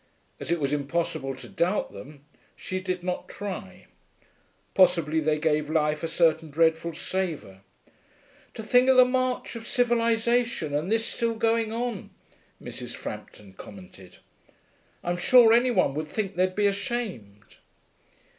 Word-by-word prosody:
As - - -7
it 170 0 +1
was 140 -1 -1
impossible 140 -2 -2
to 130 - -11
doubt 190 +1 -1
them, 140 +8 -12 0.3
she 185 - -4
did 185 -1 -4
not 180 0 -4
try. 190 -2 -7 0.9
Possibly 170 -4 +3
they 155 0 +1
gave 150 -1 0
life 150 -1 +1
a 165 - -2
certain 160 -1 +1
dreadful 160 +2 +1
savour. 160 - -4 0.9
'To 220 - -6
think 250 +4 +4
of 260 - +5
the 255 - +9
march 255 -1 -1
of 230 0 -8
civilisation, 235 - +1
and 155 +7 -1
this 225 0 +1
still 230 -1 -2
going 225 0 +1
on,' 235 -3 -4 0.5
Mrs. - - -7
Frampton 100 -2 -9
commented. 95 -1 -13 0.9
'I'm 175 0 -1
sure 230 +5 +6
any 240 +2 +4
one 185 - +2
would 155 +2 -4
think 200 +3 -3
they'd 185 +1 +1
be 205 - +1
ashamed.' 200 - -4
180 Hz, 140 wpm, -26 LUFS, 150-225 Hz, 0.9 s, the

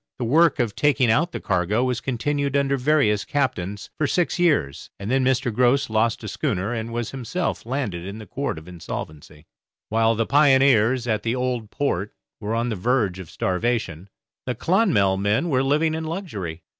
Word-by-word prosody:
The 125 - -3
work 160 +5 +4
of 120 -6 0
taking 140 -5 +3
out 165 +9 +2
the - - -5
cargo 95 +4 0
was 125 -2 -1
continued 140 +2 -1
under 140 0 +1
various 130 -6 +2
captains 105 -7 -2
for 150 - +2
six 175 +4 0
years, 150 - +1
and 100 +4 -5
then 135 0 +2
Mr. 130 -2 +1
Grose 125 +2 +2
lost 110 +1 +1
a - - -5
schooner 100 +6 -2
and 115 0 -4
was 120 -1 -3
himself 135 +2 -3
landed 115 -10 -3
in 100 +3 -7
the 110 - -9
Court 140 - -3
of 80 +2 -11
Insolvency. 80 -3 -8 0.4
While 115 +1 +2
the 115 +1 0
pioneers 130 -4 +4
at 110 -2 0
the 115 +2 -1
Old 125 -4 -2
Port 105 -8 -2 0.2
were 110 +1 -3
on 120 +1 0
the 110 - -2
verge 105 -2 0
of 90 -4 -9
starvation, 95 -3 -2 0.4
the 125 - -1
'Clonmel' 150 - +2
men 105 - +1
were 130 -3 +2
living 150 +4 +1
in 160 0 -3
luxury. 105 - -5
120 Hz, 180 wpm, -23 LUFS, 105-140 Hz, 0.4 s, work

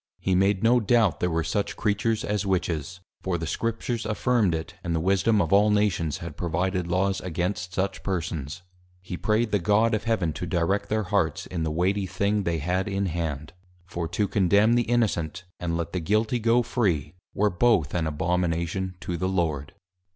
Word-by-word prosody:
He 95 - 0
made 95 +2 +2
no 120 +2 +5
doubt, 110 -5 +2
there 90 - +1
were 80 -1 0
such 100 +6 -2
Creatures 105 +1 0
as 105 -1 -1
Witches; 90 -3 -2 0.2
for 90 -2 -1
the 80 - -4
Scriptures 115 - -2
affirmed 105 -3 +1
it; 80 - -5
and 85 -2 -1
the - - +1
Wisdom 100 +5 +2
of 85 -2 +1
all 105 +2 +5
Nations 100 -7 +1
had 85 -3 -7
provided 90 +2 -1
Laws 95 +2 0
against 90 +1 -3
such 95 +1 -1
persons. 85 -3 -3 0.4
He 90 - -5
pray'd 110 +4 0
the 105 - +2
God 105 +5 +3
of 110 - -1
Heaven 100 -9 0
to 90 - -5
direct 95 +5 0
their 110 0 +1
Hearts 100 +1 0
in 90 -2 -4
the 80 - 0
weighty 95 +5 0
thing 100 +2 0
they 85 -1 0
had 90 +6 -1
in 100 0 -1
hand; 80 -3 -3 0.3
for, 85 -2 -4
_To 105 - 0
Condemn 100 +4 +3
the 120 -1 +1
Innocent, 95 -8 0 0.2
and 85 -1 -2
let 85 0 -4
the 90 - 0
Guilty 110 +7 +1
go 115 +2 +3
free, 90 - 0 0.2
were 105 0 +2
both 90 -7 +2
an 85 -3 0
Abomination 90 +3 -1
to 85 +1 -3
the 95 +3 -1
Lord. 80 -7 -1
95 Hz, 190 wpm, -26 LUFS, 85-105 Hz, 0.4 s, no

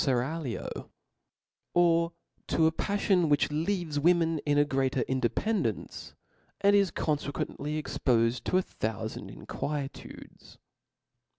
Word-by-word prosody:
/eraglio; 135 +1 -2 0.9
or 170 -1 +4 0.4
to 160 - +2
a 160 - +4
pafllon 190 -2 +1
which 145 0 +3
leaves 160 -1 -1
women 165 0 +3
in 145 0 +3
a 145 - +5
greater 135 -2 0
independence, 130 - -1 0.4
and 200 0 +5
is 200 -2 +4
confequently 150 -1 -2
ex 150 -3 -5
pofed 115 0 +2
to 185 - +1
a 185 - +2
thoufand 110 - -4
inquietudes. 145 -2 -6
150 Hz, 110 wpm, -29 LUFS, 135-175 Hz, 0.9 s, a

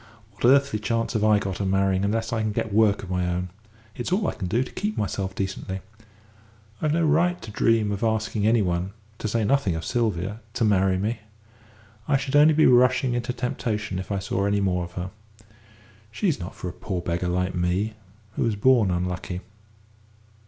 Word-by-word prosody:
What 105 - -4
earthly 135 -3 +4
chance 115 +2 -1
have 110 -2 0
I 110 -1 +5
got 100 -2 -3
of 100 - -1
marrying 95 0 +2
unless 110 +3 -1
I 115 - 0
can 110 -1 0
get 105 0 -2
work 105 -2 +3
of 95 - -7
my 90 -1 0
own? 90 +1 -2 0.5
It's 120 - -4
all 195 0 +1
I - - -1
can 90 - -5
do 115 +8 +1
to - - -10
keep 210 +2 -3
myself 95 -2 -2
decently. 95 -1 -4 1.0
I've 155 - +1
no 165 +1 +2
right 175 +4 +2
to 110 - -9
dream 110 0 +2
of 100 +2 -3
asking 110 -1 0
any 115 -1 +4
one 90 +1 -1 0.3
to - - -2
say 110 +1 0
nothing 110 -7 +2
of 80 - -4
Sylvia 105 -4 -1 0.2
to 120 - +1
marry 95 -2 +3
me. 110 +4 -2 0.9
I 140 - +3
should 135 +1 -3
only 150 +1 +6
be 155 - +5
rushing 125 0 +4
into 120 0 -1
temptation 110 -6 -3
if 95 +2 -6
I 100 - 0
saw 100 +1 -1
any 100 0 +1
more 90 -3 0
of 85 - -13
her. 90 +1 -5 1.0
She's 170 - 0
not 90 +1 -7
for - - -6
a 90 - -5
poor 95 -4 -4
beggar 85 +1 -2
like 90 +1 0
me, 90 +5 0 0.4
who - - -4
was 115 -3 +1
born 115 -1 +4
unlucky. 90 0 -2
105 Hz, 200 wpm, -25 LUFS, 95-120 Hz, 1.0 s, only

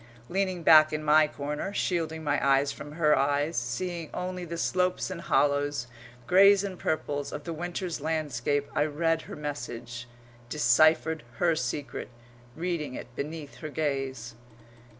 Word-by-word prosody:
Leaning 185 -2 -1
back 155 -1 +7
in 155 0 -3
my 155 +1 +5
corner, 150 +5 -4
shielding 160 -5 -1
my 145 -1 0
eyes 140 +1 +3
from 150 0 -9
her 150 -2 +3
eyes, 145 +3 +1
seeing 165 +7 -3
only 180 0 -4
the 170 0 -5
slopes 180 +2 0
and 175 -2 -5
hollows, 145 -4 +1 0.4
greys 200 +5 +6
and 190 -3 -5
purples, 145 -2 -2
of 145 - -6
the 170 - -4
winter's 175 0 -4
landscape, 145 -3 -1
I 145 - +2
read 165 +2 0
her - - -9
message, 120 -5 -6 0.4
deciphered 155 +4 +3
her 165 +7 +2
secret, 135 0 -4 0.5
reading 165 -5 -3
it 120 - -9
beneath 150 +1 -6
her 155 - -6
gaze. 135 -5 -3
155 Hz, 145 wpm, -28 LUFS, 145-170 Hz, 0.5 s, back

